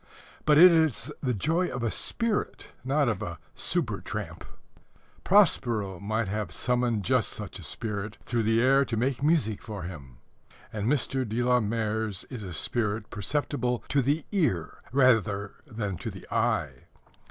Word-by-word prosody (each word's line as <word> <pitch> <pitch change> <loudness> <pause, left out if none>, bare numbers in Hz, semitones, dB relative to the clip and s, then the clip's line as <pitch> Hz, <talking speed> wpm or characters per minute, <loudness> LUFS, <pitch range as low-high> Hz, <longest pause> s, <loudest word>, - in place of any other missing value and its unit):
But 150 -1 +5
it 180 +3 +10
is 155 -5 +1
the 125 -4 0
joy 165 - +1
of 125 - -4
a 115 - 0
spirit, 230 -3 -2
not 140 +2 +2
of 110 -4 -1
a 85 -5 -5 0.2
"super - - -1
tramp." - - -6 0.8
Prospero 120 - +3
might 110 +2 -1
have 105 +2 -3
summoned 120 -3 0
just - - +2
such - - -7
a - - -10
spirit 105 -1 -4
through 120 -1 0
the 110 +1 +2
air 135 +3 +5
to 120 -4 -3
make 130 +2 0
music 145 -9 +1
for 105 -5 -7
him. 70 -8 -9 0.6
And 105 0 -2
Mr. 135 -2 0
de 115 +1 -2
la 125 0 +4
Mare's 110 -2 -1
is 125 -4 -6
a 95 -3 -6
spirit 105 +4 -1
perceptible 125 +3 -1
to 140 - +3
the 145 +4 0
ear 140 - 0
rather 110 -6 +3
than 105 - -4
to - - -5
the - - -10
eye. - - 0
115 Hz, 160 wpm, -28 LUFS, 105-135 Hz, 0.8 s, it